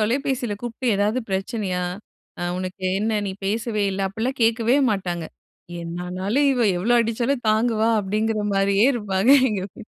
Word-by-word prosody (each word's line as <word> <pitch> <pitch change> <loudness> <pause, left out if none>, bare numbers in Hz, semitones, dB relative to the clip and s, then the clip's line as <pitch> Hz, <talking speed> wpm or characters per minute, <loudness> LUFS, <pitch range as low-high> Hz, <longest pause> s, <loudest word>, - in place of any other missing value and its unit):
தொலபேசியில 245 0 0
கூப்ட்டு 240 0 -1
ஏதாவது 210 +5 +1
பிரச்சனையா? 190 -2 -2 0.8
உனக்கு 185 +1 -6 0.2
என்ன 220 +2 0 0.2
நீ - - -2 0.2
பேசவே 215 0 -1
இல்ல 195 0 -1
அப்டில்லாம் 235 +5 -3
கேட்கவே 230 +3 +3
மாட்டாங்க. 175 -4 -2 0.6
என்னானாலும் 185 +10 -1
இவ 250 - -1 0.2
எவ்வளவு 240 +7 +2
அடிச்சாலும் 235 +3 -1
தாங்குவா 220 0 +2
அப்டின்கற 215 +2 -1
மாரியே 200 +3 +3
இருப்பாங்க 205 +1 +1 0.2
எங்க 200 -3 -2
வீட்ல. 225 - -11
215 Hz, 130 wpm, -23 LUFS, 195-235 Hz, 0.8 s, கேட்கவே